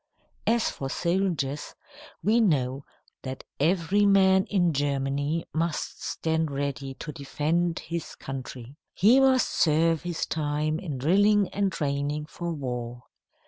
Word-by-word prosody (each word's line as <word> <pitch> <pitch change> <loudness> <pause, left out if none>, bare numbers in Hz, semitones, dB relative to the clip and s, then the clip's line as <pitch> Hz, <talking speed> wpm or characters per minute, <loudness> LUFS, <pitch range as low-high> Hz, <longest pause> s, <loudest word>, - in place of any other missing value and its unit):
As 230 0 +3
for 135 - -5
soldiers, 170 -5 -1 0.5
we 220 +3 +3
know 140 - +1 0.4
that 130 0 -6 0.2
every 175 +6 +2
man 190 -1 +5
in 175 -5 +1
Germany 140 +2 -1
must 165 0 -2
stand 160 -1 -1
ready 140 -1 -3
to 150 - -7
defend 165 +4 -1
his 170 -1 -5
country. 130 0 -8 0.2
He 230 +7 +6
must 265 -2 +4
serve 165 0 +2
his 175 -2 -3
time 155 0 -1
in 155 -8 -5
drilling 200 +8 +3
and 200 -1 0
training 145 -1 -2
for 170 +2 -5
war. 125 -5 -5
160 Hz, 125 wpm, -27 LUFS, 140-185 Hz, 0.5 s, He